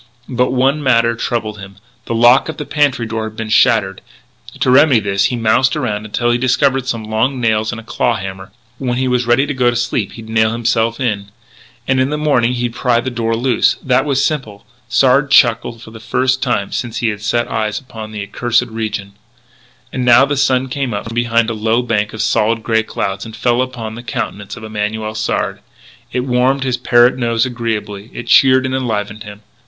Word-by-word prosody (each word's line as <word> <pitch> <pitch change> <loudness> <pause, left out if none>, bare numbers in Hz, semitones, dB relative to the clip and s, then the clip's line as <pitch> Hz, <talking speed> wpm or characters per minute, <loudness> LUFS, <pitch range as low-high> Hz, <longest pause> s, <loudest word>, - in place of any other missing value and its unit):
But 125 0 +1
one 135 +4 +1
matter 115 -4 +3
troubled 110 -3 -3
him: 100 0 -10 0.3
the 115 - -3
lock 120 +6 +5
of 160 - -5
the 150 - -5
pantry 145 -6 +1
door 110 0 -3
had 110 - -17
been 115 -1 -4
shattered. 110 -5 +3 0.6
To 130 - +2
remedy 140 -2 +5
this 100 -1 0
he 125 - 0
moused 120 +4 +2
around 110 -8 -2
until 120 +3 0
he 120 - +1
discovered 130 +1 +1
some 115 -3 -2
long 110 +5 -1
nails 110 -2 +1
and 115 - -6
a - - -11
claw 115 +1 0
hammer. 95 -1 -7 0.3
When 125 -2 -2
he 130 0 0
was 125 -1 0
ready 120 +4 +3
to 145 - -3
go 125 -2 +2
to 120 - -2
sleep 120 -3 -1
he'd 115 -1 -10
nail 110 0 +1
himself 115 0 0
in. 105 -6 -2 0.6
And 130 0 +2
in 130 +1 +1
the 150 - -2
morning 125 -5 +1
he'd 120 -1 -2
pry 120 -1 +1
the 130 +2 -3
door 115 -1 -1
loose. 120 +1 +2
That 125 0 +2
was 140 -2 +1
simple. 110 -10 -4 0.2
Sard 135 +3 +3
chuckled 115 -3 +3
for 110 - -12
the 110 - -11
first 130 +3 0
time 120 -6 -1
since 120 -2 -4
he 115 -1 0
had 105 -1 -5
set 120 +3 0
eyes 110 -1 -2
upon 110 -5 -9
the 105 -2 -5
accursed 120 +4 0
region. 110 -3 -4 0.8
And 130 - -2
now 125 +2 +6
the 145 +1 -2
sun 130 -2 +1
came 130 -4 -3
out 100 - -4
from - - -7
behind 115 -1 +1
a - - -2
low 110 +2 0
bank 105 -3 -1
of 110 - -2
solid 110 +1 +1
grey 110 -1 +2
cloud, 100 -3 -4
and 110 -1 -9
fell 120 +2 +1
upon 120 -4 -5
the 120 - -8
countenance 105 -3 -5
of 110 - -10
Emanuel 110 0 -3
Sard. 110 0 -2 0.5
It 125 - -1
warmed 130 +2 +1
his 130 -2 -1
parrot 120 0 +4
nose 115 -1 +1
agreeably; 110 -4 -4
it 120 - -6
cheered 130 +1 +5
and 130 - -2
enlivened 110 -5 -3
him. 105 0 -11
120 Hz, 210 wpm, -16 LUFS, 110-130 Hz, 0.8 s, now